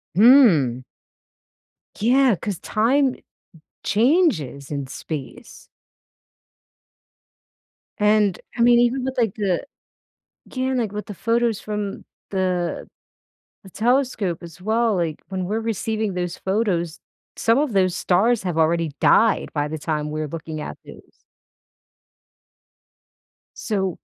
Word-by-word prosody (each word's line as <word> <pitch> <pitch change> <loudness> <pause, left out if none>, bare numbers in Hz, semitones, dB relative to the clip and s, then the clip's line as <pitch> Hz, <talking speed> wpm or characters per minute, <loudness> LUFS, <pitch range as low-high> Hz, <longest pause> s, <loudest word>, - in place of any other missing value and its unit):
Mm. 180 - +5 1.1
Yeah, 250 +1 +4
'cause 195 -1 -5
time 260 +5 +1 0.7
changes 210 - +1
in 140 -2 -3
space. 155 - -8 2.3
And, 210 -2 +2 0.2
I - - 0
mean, 240 0 +6
even 245 +2 +2
with, 265 0 -4
like, 225 -5 +1
the 195 -1 -1 0.8
Yeah, 260 0 -2
like, 230 -5 -1
with 210 0 -5
the 205 - -6
photos 230 +1 0
from 210 -2 -5 0.3
the 185 -2 -1 0.8
the 190 - -14
telescope 235 - 0
as 170 +1 -11
well, 220 +2 +1
like, 165 -4 -2
when 185 -1 -3
we're 215 +3 -1
receiving 220 -1 -2
those 180 -1 -3
photos, 190 -5 -1 0.4
some 230 +2 +2
of 290 -5 0
those 185 -2 +2
stars 210 +6 +2
have 175 -3 -2
already 165 0 +2
died 225 -1 +3
by 150 -1 -1
the 155 - -5
time 150 -1 -3
we're 155 0 -3
looking 160 0 -6
at - - -6
those. - - -16 2.3
So 190 -5 -2
205 Hz, 115 wpm, -22 LUFS, 170-235 Hz, 2.3 s, mean